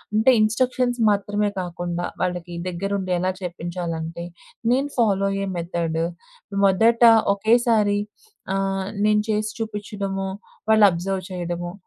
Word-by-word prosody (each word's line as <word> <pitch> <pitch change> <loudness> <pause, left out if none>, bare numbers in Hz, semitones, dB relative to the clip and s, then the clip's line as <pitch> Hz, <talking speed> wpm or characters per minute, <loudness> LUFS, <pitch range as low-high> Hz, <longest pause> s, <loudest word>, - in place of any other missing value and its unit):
అంటే 220 +4 +5
ఇన్‌స్ట్రక్షన్స్ 245 +2 +1
మాత్రమే 205 0 0
కాకుండా, 175 0 -4 0.2
వాళ్ళకి 175 -1 -2
దగ్గరుండెలా 185 0 -1
చెప్పించాలంటే, 170 -1 -4 0.5
నేను 270 +3 +1
ఫాలో 200 -5 +2
అయ్యే 195 0 -2
మెథడు 165 -1 -1 0.6
మొదట 225 +5 +4 0.3
ఒకేసారి 220 -1 +3 0.6
ఆహ్, 195 0 -1 0.2
నేను 210 0 +4
చేసి 215 0 0
చూపిచ్చడమో, 200 -3 -4 0.4
వాళ్ళు 220 -1 +7
అబ్జర్వ్ 185 +2 -3
చేయడమో, 175 -1 -4
195 Hz, 100 wpm, -23 LUFS, 175-215 Hz, 0.6 s, వాళ్ళు